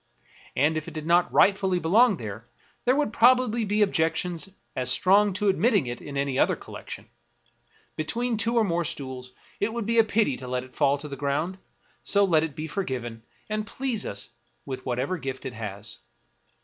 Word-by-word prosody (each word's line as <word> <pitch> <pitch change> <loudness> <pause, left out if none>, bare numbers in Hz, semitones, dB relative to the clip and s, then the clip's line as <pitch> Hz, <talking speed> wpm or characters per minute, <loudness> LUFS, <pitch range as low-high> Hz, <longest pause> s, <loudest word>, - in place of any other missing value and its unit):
And 150 +4 +2
if 155 - -4
it 165 - -9
did 155 -1 -5
not 175 +1 +3
rightfully 190 -2 +4
belong 200 +6 +4
here, 110 0 -7 0.4
there 250 +1 +4
would 290 -6 0
probably 240 -1 +4
be 210 0 +2
objections 175 -1 0 0.3
as 130 -1 +1
strong 200 +8 +4
to 205 +2 -1
admitting 195 - +3
it 120 0 -5
in 140 -1 -6
any 140 -1 0
other - - +3
collection. - - -9 0.9
Between 230 +10 -1
two 230 +3 0
or 230 - +5
more 170 -4 0
stools, 130 -4 -6 0.3
it 205 +2 0
would 235 -2 -3
be 230 +1 +3
a - - +8
pity 215 - +1
to 130 - -8
let 125 0 -2
it 130 - -16
fall 140 -1 +3
to 150 - -7
the 140 - -6
ground; 150 +7 -1 0.4
so 200 0 +3
let 160 -4 +3
it 160 -3 -4
be 155 - -4
forgiven, 130 - -4 0.3
and 215 0 -3
please 250 -3 -2
us 100 +3 -5 0.3
with 130 -2 -6
whatever 130 +9 -1
gift 135 -1 -5
it 130 - -4
has. 105 -2 -7
165 Hz, 190 wpm, -26 LUFS, 130-210 Hz, 0.9 s, a